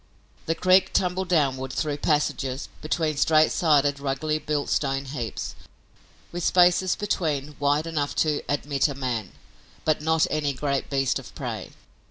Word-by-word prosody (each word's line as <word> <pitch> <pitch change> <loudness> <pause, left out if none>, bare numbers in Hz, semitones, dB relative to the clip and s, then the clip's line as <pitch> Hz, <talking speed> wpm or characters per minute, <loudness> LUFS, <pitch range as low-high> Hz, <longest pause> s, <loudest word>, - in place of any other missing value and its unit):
The 165 - +1
creek 185 +1 +4
tumbled 185 0 0
downward, 135 -6 +1
through 145 +2 -2
passages, 145 -3 -1
between 155 -1 -1
straight 155 +2 +4
sided, 145 -4 +2
ruggedly 145 +3 -1
built 150 -2 -2
stone 135 -1 0
heaps, 125 -6 -5 0.8
with 175 0 -4
spaces 180 +1 +4
between 150 -8 -2
wide 145 +2 +2
enough 150 -3 -2
to 150 -2 0
admit 145 -1 +1
a 140 - -5
man, 120 -7 -3 0.5
but 155 -1 +2
not 160 +1 +2
any 145 -2 0
great 140 0 -2
beast 135 -2 +1
of - - -13
prey. - - -5
150 Hz, 145 wpm, -25 LUFS, 140-160 Hz, 0.8 s, creek